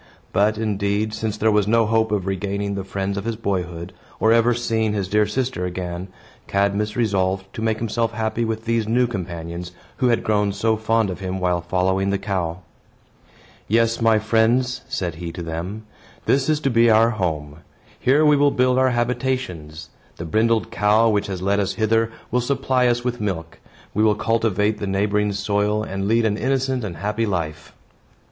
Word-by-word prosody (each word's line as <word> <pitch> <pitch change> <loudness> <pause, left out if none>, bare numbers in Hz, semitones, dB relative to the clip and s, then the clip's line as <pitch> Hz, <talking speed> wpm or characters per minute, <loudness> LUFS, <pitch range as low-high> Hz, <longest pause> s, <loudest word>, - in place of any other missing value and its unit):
But, 105 +3 +2
indeed, 105 0 -1
since 110 -1 -3
there 110 +1 +2
was 105 -1 +2
no 115 +1 +4
hope 110 0 +1
of 100 -3 0
regaining 100 +1 -2
the 100 -1 -3
friends 95 +1 -3
of - - -6
his 115 -1 -1
boyhood, 90 -5 -3 0.3
or 110 +1 +4
ever 115 +1 +4
seeing 110 -2 0
his 100 -3 -1
dear 105 +2 +2
sister 125 -2 -2
again, 90 0 -4 0.4
Cadmus 100 +2 0
resolved 95 -4 0
to - - -6
make 110 -1 0
himself 115 0 -1
happy 110 +1 -1
with 110 0 -3
these 115 -1 0
new 125 +3 +3
companions, 90 -4 -5 0.2
who 125 - +2
had 120 -1 +2
grown 105 -2 +1
so 110 +2 +1
fond 110 -1 +1
of 90 - -6
him 95 -1 -3
while 90 -1 +1
following 95 +2 0
the 100 - +1
cow. 90 -4 -3 1.1
"Yes, 115 +1 +2
my 115 -1 +4
friends," 115 +4 +2
said 90 -3 -2
he 85 -1 -4
to 85 - -6
them, 85 +6 -5 0.4
"this 135 +2 +2
is 155 -1 +2
to 135 - +1
be 115 0 +5
our 115 +1 +5
home. 80 -8 -3 0.4
Here 145 +4 +3
we 150 -1 +6
will 145 0 +4
build 125 -1 +2
our 130 0 +4
habitations. 120 - -2 0.2
The 85 - -6
brindled 110 +6 +1
cow, 105 +2 +3
which 105 -1 0
has 95 -2 -5
led 100 +1 +2
us 100 - -1
hither, 115 0 +1 0.2
will 125 +1 +2
supply 130 -1 +1
us 120 0 +1
with 120 -2 -2
milk. 85 -5 -4 0.3
We 105 - +2
will 105 -1 +4
cultivate 110 -1 +1
the 100 - -3
neighboring 105 +1 +1
soil 105 +1 0
and 95 -2 -3
lead 115 +1 +3
an 105 -1 +1
innocent 130 0 0
and 90 -6 -5
happy 105 +6 -1
life." 80 -5 -4
105 Hz, 185 wpm, -22 LUFS, 95-115 Hz, 1.1 s, we